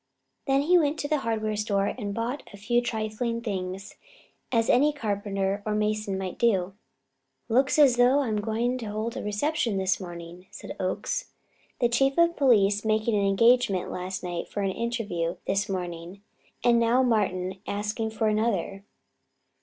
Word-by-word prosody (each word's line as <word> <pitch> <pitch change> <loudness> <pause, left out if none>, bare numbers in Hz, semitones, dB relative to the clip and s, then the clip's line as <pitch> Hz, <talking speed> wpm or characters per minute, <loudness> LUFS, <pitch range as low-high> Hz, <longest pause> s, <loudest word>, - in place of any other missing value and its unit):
Then 275 +1 +3
he 355 +4 +5
went 300 -1 +1
to 290 - -3
the 305 0 +1
hardware 220 -3 -1
store 205 -2 0
and 205 -2 -3
bought 230 +6 -3
a 200 - -11
few 240 +4 +1
trifling 230 0 -2
things, 195 -2 -5 0.5
as 230 -2 +2
any 290 +5 +4
carpenter 200 -6 -2
or 210 0 -1
mason 210 -2 -1
might 190 -1 -5
do. 195 -5 +2 0.8
"Looks 260 +5 +3
as 275 -5 +6
though 250 +4 +5
I 270 - -2
am 210 -1 0
going 235 +4 -1
to 225 - -6
hold 215 +2 -3
a - - -4
reception 230 +2 -1
this 190 -1 +1
morning," 175 0 -9
said - - -9
Oakes: - - -2 0.5
"The 240 - +4
Chief 270 +3 +1
of 340 0 +4
Police 205 -7 +3
making 220 +1 +1
an 200 -1 +2
engagement 205 -1 +3
last 185 +1 -5
night 175 -1 -4
for 205 - -4
an 195 - 0
interview 205 -7 -2
this 200 +1 0
morning, 180 +1 -5 0.4
and 235 -1 +4
now 235 +3 +3
Martin 190 -5 0
asking 210 +2 -2
for 220 0 -1
another." 210 -3 0
215 Hz, 165 wpm, -26 LUFS, 195-240 Hz, 0.8 s, as